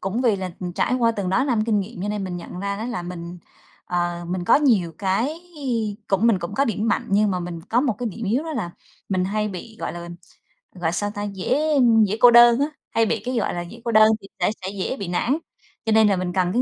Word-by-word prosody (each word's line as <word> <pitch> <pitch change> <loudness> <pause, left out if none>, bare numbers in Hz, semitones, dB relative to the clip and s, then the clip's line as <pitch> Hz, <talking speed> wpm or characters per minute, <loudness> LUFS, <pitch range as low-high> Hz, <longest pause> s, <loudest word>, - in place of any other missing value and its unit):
cũng 195 +5 -2
vì 230 -5 +3
là 185 -1 -4 0.2
trải 250 - +1
qua 235 -2 +3
từng 200 -4 -3
đó 250 +8 +2
năm 235 -6 +1
kinh 215 -3 +2
nghiệm 200 0 -7
cho 205 - -2
nên 210 -1 -2
mình 180 -2 -4
nhận 175 +1 -8
ra 200 0 -2
đó 215 - -5
là 235 -6 -3
mình, 175 0 -7 0.5
ờ, 175 -1 -2
mình 180 0 -2
có - - +5
nhiều 225 - +2
cái 205 +9 0 0.7
cũng 195 +3 +2
mình 225 -5 +4
cũng 175 +3 -6
có 275 - +2
điểm 220 -2 -1
mạnh - - 0
nhưng 205 +1 +3
mà 180 -1 -1
mình 175 -1 -6
có 225 +8 0
một 260 -3 +1
cái 245 -2 -2
điểm 225 +3 -7
yếu 230 +8 +1
đó 320 - -4
là 220 - -3 0.4
mình 185 -2 0
hay 210 +2 -1
bị, 210 +4 -8
gọi - - -3
là, 175 0 -7 0.7
gọi 175 -3 -2
sao 205 +4 -2
ta, 205 - -3
dễ 200 +3 -1 0.5
dễ 205 +2 -2
cô 245 - +8
đơn 240 0 +7
á, 285 - +3 0.2
hay 225 0 +2
bị - - -1
cái, 255 +1 -2
gọi - - 0
là, 175 - -3
dễ 195 +7 -10
cô 235 - 0
đơn 215 0 +7
thì 195 - -12
sẽ - - +2
sẽ 190 - -4
dễ 195 +7 -2
bị 200 - -5
nản, 235 - 0 0.5
cho 225 - +1
nên 220 0 +5
là 200 - +3
mình 180 -1 -3
cần 180 -1 +1
cái 245 - +2
205 Hz, 260 wpm, -23 LUFS, 180-230 Hz, 0.7 s, cô